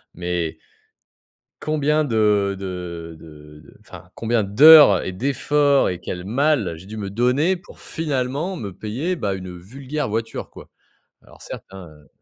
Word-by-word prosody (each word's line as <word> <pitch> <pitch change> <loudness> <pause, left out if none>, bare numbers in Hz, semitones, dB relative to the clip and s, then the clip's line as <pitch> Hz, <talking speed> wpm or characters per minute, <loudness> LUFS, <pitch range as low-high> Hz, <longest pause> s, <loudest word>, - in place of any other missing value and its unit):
«Mais 85 -2 -3 1.1
combien 155 0 +1
de 105 -4 +1
de 90 -3 -7
de 75 -1 -14
de - - -19
enfin - - -13
combien 115 -1 0
d'heures 140 - +8
et 95 - -4
d'efforts 140 +5 +1
et 90 - -6
quel 90 0 -6
mal 125 - +1
j'ai 90 +4 -13
dû 110 - -8
me 100 -2 -5
donner 125 - +1
pour 180 +4 -15
finalement 150 +3 -3
me 105 - -6
payer, 130 - -3
bah, 100 - -2
une 90 -1 -8
vulgaire 135 - -5
voiture, 115 +1 -4
quoi». - - -14 0.5
Alors - - -19
certes, - - -9
hein, 95 -3 -10
heu 75 -1 -18
110 Hz, 150 wpm, -21 LUFS, 90-145 Hz, 1.1 s, d'heures